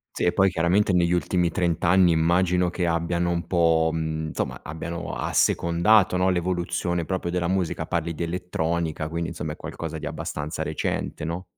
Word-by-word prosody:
Sì, - - -2
e 90 - +3
poi 95 -1 +4
chiaramente 90 +4 +2
negli 85 -1 +2
ultimi 90 0 +1
30 85 -2 0 0.3
immagino 85 +2 +2
che 90 0 -2
abbiano 85 +1 0
un 85 0 -1
po', 80 -2 +3
mhmm, 80 -1 -2
insomma - - -3
abbiano 85 +2 -5
assecondato, 90 +3 +3
no, 95 +1 +2
l'evoluzione 85 -1 -1
proprio 95 -2 -2
della 90 -1 0
musica. 95 -2 -1
Parli 85 0 -2
di 85 - -3
elettronica, 85 -2 -2
quindi, 85 +1 -3
insomma 75 0 -5
è - - -9
qualcosa 80 -1 -6
di - - -7
abbastanza 75 +1 -4
recente, - - -3
no? 85 +3 -4
85 Hz, 165 wpm, -25 LUFS, 80-90 Hz, 0.3 s, poi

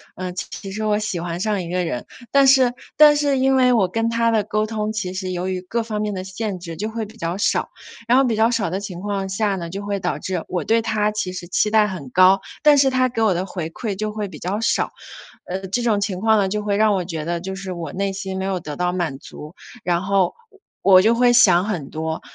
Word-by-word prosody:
呃， 185 -1 -4
其 195 +2 -7
实 215 +2 -4
我 210 -1 +2
喜 210 -4 -3
欢 170 0 -4
上 205 -1 0
一 170 - -7
个 180 +1 0
人， 125 - -4 0.3
但 275 -1 +5
是 260 -2 +5 0.2
但 295 0 +8
是 285 -2 +1
因 265 0 +3
为 255 -1 +4
我 200 -6 +3
跟 225 +4 -1
他 230 0 +1
的 215 -2 +2
沟 215 +1 -1
通， 215 -1 -3
其 185 -4 -3
实 185 -1 -4
由 180 +1 -3
于 185 -1 -2
各 230 +6 -2
方 215 -2 -3
面 210 -1 -2
的 185 -1 -4
限 190 0 -4
制 170 -2 -7
就 215 +5 -3
会 225 0 -4
比 220 +2 -15
较 170 0 -3
少， 205 - 0 0.4
然 245 +2 +5
后 270 - +5
比 235 -3 +1
较 225 +2 +3
少 215 -6 0
的 190 +3 -2
情 190 -3 -7
况 200 -1 -2
下 200 +1 0
呢， 170 -3 -5
就 195 +4 -5
会 200 -1 -2
导 180 -1 -2
致 185 -3 -3
我 180 - -2
对 230 +1 +2
他 215 -2 0
其 210 -3 -3
实 180 -1 -7
期 210 +4 +1
待 215 -1 +4
很 165 -9 -7
高， 185 +4 +5 0.2
但 300 -1 +6
是 270 -1 +5
他 255 -1 +2
给 230 -2 -3
我 215 -4 +3
的 180 +2 -2
回 170 -5 -5
馈 205 +3 -4
就 215 +2 -3
会 210 -1 -4
比 160 -6 -11
较 195 +4 -2
少。 230 - 0 0.5
呃， 190 +1 -5
这 220 +6 -1
种 220 -4 +2
情 195 -3 -2
况 220 +1 +3
呢， 195 - +2
就 210 +2 -2
会 205 -1 -1
让 215 -1 +4
我 185 - 0
觉 160 -3 -5
得 170 +1 -2
就 190 +1 -5
是 190 -1 -6
我 170 -4 -5
内 195 +1 -1
心 190 -1 -5
没 190 - -2
有 190 -2 -1
得 150 -3 -7
到 180 +2 0
满 170 -6 -2
足， 150 +4 -11 0.3
然 175 0 +1
后 195 -2 +1 0.5
我 185 -1 +7
就 225 +3 +4
会 245 0 +4
想 190 -7 +5
很 170 -10 -3
多， 160 0 -4
200 Hz, 280 characters per minute, -21 LUFS, 180-220 Hz, 0.5 s, 但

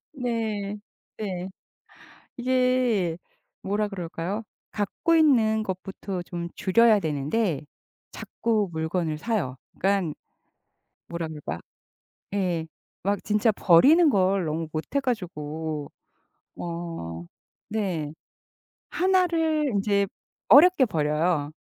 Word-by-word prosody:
네. 220 -5 -2 0.4
네. 185 -3 -4 0.9
이게 250 -8 +2 0.5
뭐라 205 +2 0
그럴까요? 180 +2 -4 0.3
갖고 210 +11 0
있는 230 -9 +4
것부터 190 -1 -5
좀 175 -1 -5
줄여야 220 +3 +5
되는데 155 +3 -1 0.5
자꾸 220 -4 -1
물건을 160 0 -1
사요. 180 - -2 0.2
그니깐 190 -5 0 0.9
뭐라 170 -1 -4
그럴까? 150 - -6 0.7
예. 180 -5 0 0.4
막 200 +2 0
진짜 210 +1 +2
버리는 280 - +6
걸 190 -4 +2
너무 160 +1 -2
못해 160 - -1
가지고 160 - -3 0.7
어 165 - -5 0.4
네. 185 -9 -2 0.8
1 370 0 +3
를 320 -3 +1
인제 200 0 +2 0.4
어렵게 295 - +8
버려요, 150 -3 0
195 Hz, 180 characters per minute, -26 LUFS, 165-230 Hz, 0.9 s, 어렵게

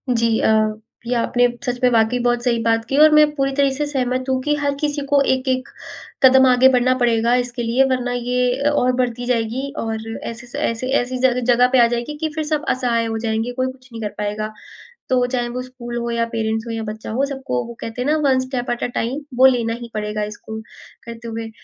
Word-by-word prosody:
जी। 230 -1 +2
अ, - - +2 0.6
ये 245 - 0
आपने 245 +1 +2 0.2
सच 245 -1 -2
में 250 - +6
वाक़ई 230 +1 +2
बहुत 240 0 0
सही 235 -2 +1
बात 225 0 +2
की 270 - -3
है 295 - +5
और 310 0 +8
मैं 305 0 +7
पूरी 275 -1 0
तरह 280 0 +3
से 295 +2 -2
सहमत 255 -2 -1
हूँ 260 0 +1
कि 295 +1 +1
हर 285 -1 -1
किसी 290 -1 -1
को 280 0 +3
एक-एक 260 -1 -1 0.6
कदम 265 0 +7
आगे 255 +1 +6
बढ़ना 255 0 +3
पड़ेगा 235 -1 +2
इसके 245 0 -6
लिए 235 +3 +3
वरना 250 -1 -1
ये 245 0 0
अ, 290 - +3
और 255 -4 +2
बढ़ती 245 -1 -1
जाएगी 245 +2 -1
और 225 -4 -2 0.3
ऐसे 235 +1 -7
स - - -11
ऐसी 230 +2 -2
ऐसी 255 +1 -4
सारी 250 -1 +2
जगह 245 +1 +5
पे 260 - +4
आ - - +5
जाएगी 240 +5 -3
कि 315 +1 -2
फिर 315 - -1
सब 305 0 -2
असहाय 240 -3 +1
हो 225 0 -2
जाएँगे 225 +2 -1
कोई 255 - +2
कुछ 255 0 -20
नहीं 230 -1 -7
कर 210 - -2
पाएगा। 210 +1 -3 0.6
तो 250 -1 +3
चाहे 245 -1 -1
वो 250 +1 -4
स्कूल 245 -2 -7
हो 235 0 -3
या 230 0 0
पेरेंट्स 220 -1 -2
हो 230 - -4
या 225 -1 -3
बच्चा 215 0 -6
हो 265 +5 +1
सबको 265 - -3
वो 235 - -8
कहते 225 +2 -5
हैं 265 - 0
ना 310 - +3
one 260 -1 +3
step 255 -1 -3
at 240 - -3
a - - +1
time. 245 +5 -1 0.2
वो 260 - +6
लेना 235 -3 +3
ही 235 0 -8
पड़ेगा 210 0 -2
इसको, 215 +1 -7 0.4
करते 235 0 -9
हुए। 225 0 -5
245 Hz, 235 wpm, -20 LUFS, 230-260 Hz, 0.6 s, और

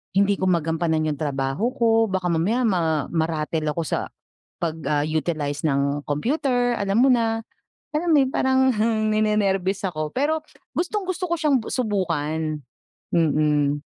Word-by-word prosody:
hindi 200 0 +3
ko 190 - 0
magampanan 165 -2 +1
yung 145 -2 -4
trabaho 140 - -1
ko, 225 -2 +3
baka 185 -2 -1
mamaya 205 +10 +1
ma 165 - +1
ma-rattle 160 -1 -1
ako 170 - -1
sa - - -2 0.5
pag, 165 -1 -1
ah, 145 -1 +1
utilize 155 -2 -2
ng 140 0 +1
computer 245 - 0
alam 200 +2 +1
mo 270 - +5
na, 225 -2 +1 0.5
alam 335 +2 0
mo 305 - +6
yung 265 -1 +1
parang 265 0 +3
heng 215 0 +1
ninenerbyos 200 -3 +1
ako 155 -4 -3
pero 305 - 0 0.3
gustong-gusto 370 -1 -2
ko - - +3
siyang 300 -3 +3
bu - - -7
subukan, 160 - -1 0.5
mm. 150 -3 +2
190 Hz, 145 wpm, -23 LUFS, 155-235 Hz, 0.5 s, mo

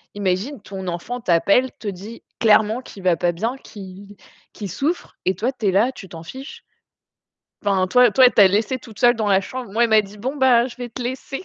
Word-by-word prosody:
Imagine, 205 +7 -2
ton 190 -2 -8
enfant 215 +8 -5
t'appelle, 200 +8 +2
te 215 - -8
dit 200 +4 -8 0.2
clairement 220 +2 +3
qu'il 195 -6 -13
va 180 -2 +3
pas 175 +1 0
bien, 225 +9 -3
qu'il 200 -2 -12 0.4
qu'il 205 -3 -7
souffre 300 - -3
et 185 0 +1
toi, 235 +8 -1
tu 220 -6 -3
es - - +3
là, 220 +7 +2
tu 190 -7 -12
t'en 165 -1 -10
fiches. 265 - -10 1.0
Enfin, 190 -2 +1
toi 250 +3 +5
toi, 260 +4 +6
elle 250 - +5
t'a 200 -3 +7
laissée 215 +6 0
toute 225 -4 -14
seule 240 0 +5
dans 215 -2 -2
la 195 -1 +3
chambre. 250 0 -7
Moi, 235 +3 +2
elle - - -4
m'a 220 -1 +5
dit: 205 +1 -13
«Bon, 260 +7 -4
bah, 255 -3 +4
je 240 - -11
vais 245 -1 -6
te 245 - -8
laisser». 260 +5 -5
215 Hz, 225 wpm, -21 LUFS, 195-250 Hz, 1.0 s, t'a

